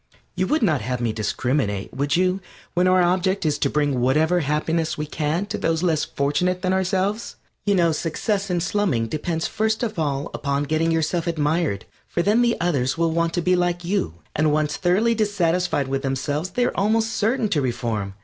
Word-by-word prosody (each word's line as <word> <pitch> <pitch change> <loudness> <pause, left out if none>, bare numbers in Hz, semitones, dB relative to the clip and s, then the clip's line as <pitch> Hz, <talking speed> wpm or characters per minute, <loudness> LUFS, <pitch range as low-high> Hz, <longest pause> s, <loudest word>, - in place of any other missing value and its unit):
You - - -1
would 305 -4 +1
not 155 -10 +2
have 125 +3 -2
me 115 -2 -1
discriminate, 110 -2 -1
would 140 +1 0
you, 185 +2 +2 0.3
when 180 +1 +2
our 185 0 +4
object 185 +1 +1
is 150 -1 +1
to - - +1
bring 145 -4 0
whatever 155 +7 +3
happiness 160 +2 -1
we 150 - -2
can 155 +5 -1
to 205 - -4
those 165 +1 0
less 160 -4 +1
fortunate 180 +6 0
than 185 0 +1
ourselves? 190 +3 -1 0.3
You 200 - +4
know 170 -3 +3
success 195 +6 -1
in 175 -1 0
slumming 180 - 0
depends 160 +4 -2
first 220 +2 0
of 215 -6 -2
all 145 -1 -1
upon 140 0 -1
getting 155 +3 +1
yourself 165 +1 0
admired, 155 - 0 0.2
for 170 - -1
then 210 +5 +3
the 235 -1 +2
others 140 -6 0
will 165 0 +2
want 170 0 0
to 175 - 0
be 180 +1 +3
like 175 -1 0
you, 170 - -1 0.2
and 155 0 +2
once 150 0 +1
thoroughly 195 +6 +2
dissatisfied 180 -8 +1
with 135 0 -1
themselves 145 +5 -2
they 245 +7 0
are - - -1
almost 220 +2 +1
certain 225 +2 +1
to 150 - +1
reform. 115 -6 -2
165 Hz, 195 wpm, -23 LUFS, 145-185 Hz, 0.3 s, our